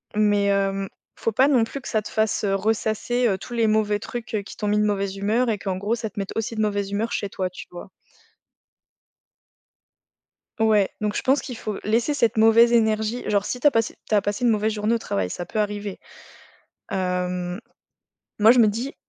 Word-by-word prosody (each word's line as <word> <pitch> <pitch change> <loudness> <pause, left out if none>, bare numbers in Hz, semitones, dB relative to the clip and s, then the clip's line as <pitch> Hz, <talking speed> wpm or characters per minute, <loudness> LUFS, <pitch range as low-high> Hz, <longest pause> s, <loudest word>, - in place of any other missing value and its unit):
mais 205 -1 +3
hem, 195 -1 0 0.3
faut 225 - -1
pas 255 +6 +4
non 260 -5 +4
plus 225 +5 -5
que 265 - -10
ça 220 - 0
te 210 - -9
fasse 220 -1 0
ressasser, 220 +4 0
heu, 195 -4 +1
tous 240 - -9
les 230 -2 +2
mauvais 215 -1 +1
trucs 225 0 -6
qui - - -11
t'ont 210 - -3
mis 210 +1 +2
de - - +3
mauvaise 200 -2 -1
humeur 215 +5 +1
et 215 -2 -1
qu'en 190 -2 -3
gros, 205 +4 -1
ça 225 -2 -4
te 205 - -8
mette 195 - -5
aussi 225 +1 -2
de 220 - -1
mauvaise 205 -2 -1
humeur 220 +3 -1
chez 200 - -2
toi, 185 -1 -3
tu - - -10
vois? 175 +1 -10 2.7
Ouais. 215 -3 +3
Donc 210 0 -1
je - - -1
pense 270 +2 +3
qu'il 250 -4 -7
faut 210 -3 -5
laisser 230 +7 +1
cette 235 -5 +1
mauvaise 225 +2 +6
énergie. 220 +1 +1
Genre, 205 -1 +2
si 250 - -3
tu 245 - -9
as - - +5
passé 225 -2 0
tu - - -3
as 205 - +4
passé 205 +4 -2
une 235 - +5
mauvaise 215 0 +1
journée 210 +2 0
au - - +2
travail, 95 - -2
ça 175 - -5
peut 215 - -3
arriver, 205 -1 -3 0.9
hem, 180 0 -2 0.8
moi, 215 +2 +7
je 250 - +5
me 230 - +7
dis: 230 +7 -2
215 Hz, 210 wpm, -23 LUFS, 200-225 Hz, 2.7 s, moi